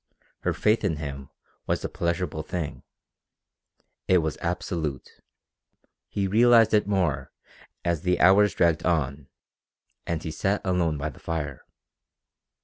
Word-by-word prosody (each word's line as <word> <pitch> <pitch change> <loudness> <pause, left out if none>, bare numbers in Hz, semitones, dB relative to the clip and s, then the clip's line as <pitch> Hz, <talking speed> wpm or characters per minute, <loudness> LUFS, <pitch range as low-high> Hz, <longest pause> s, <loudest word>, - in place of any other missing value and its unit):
Her - - -1
faith 110 +2 +2
in 95 -6 +1
him 70 -3 -6 0.4
was - - -1
a - - +1
pleasurable 85 -2 -2
thing. 85 -1 -5 1.3
It 95 - +5
was 80 -3 0
absolute. 80 -5 -3 1.0
He 100 - -1
realized 115 +2 +5
it 105 -1 +3
more 85 -10 0 0.5
as 85 -3 0
the 90 -1 +1
hours 95 0 +5
dragged 85 -3 +2
on 75 -4 -1 0.8
and 85 -2 -2
he 80 - -4
sat 95 +6 0
alone 90 -4 +1
by 75 +2 -3
the 70 - -13
fire. 75 -5 -4
85 Hz, 130 wpm, -26 LUFS, 75-95 Hz, 1.3 s, It